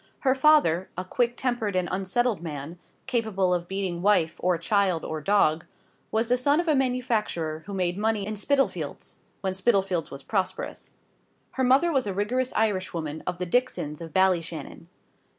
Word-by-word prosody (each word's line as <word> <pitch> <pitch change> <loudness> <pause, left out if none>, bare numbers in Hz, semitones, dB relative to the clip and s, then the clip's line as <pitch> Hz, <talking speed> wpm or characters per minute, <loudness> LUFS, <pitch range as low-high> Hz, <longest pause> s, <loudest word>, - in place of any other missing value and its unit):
Her 260 -2 +3
father 265 - +4
a 185 - -3
quick 240 +5 0
tempered 240 -6 -1
and 180 -1 +1
unsettled 195 +2 0
man, 160 +1 -6 0.3
capable 220 -7 0
of 175 -1 -2
beating 190 -3 -3
wife, 180 -5 +2
or 180 -1 +1
child, 185 -1 +1
or 155 -1 -4
dog 165 -3 +2 0.4
was 225 +1 0
the 250 +1 +3
son 285 +5 +3
of 345 - -1
a 310 - +4
manufacturer 230 - -1
who 200 - -6
made 180 0 -1
money 215 -2 0
in 215 +1 -4
Spitalfields, 275 +6 -1 0.2
when 190 -1 -1
Spitalfields 190 -4 +1
was 135 0 -9
prosperous. 190 -4 -3 0.6
Her 260 - -1
mother 270 +7 +4
was 265 -7 +1
a 195 - -3
rigorous 250 +6 0
Irishwoman, 185 -8 -1
of 180 -1 -2
the 180 - -2
Dixons 175 -8 -1
of 165 -1 -7
Ballyshannon. 170 -4 0
195 Hz, 165 wpm, -26 LUFS, 175-240 Hz, 0.6 s, father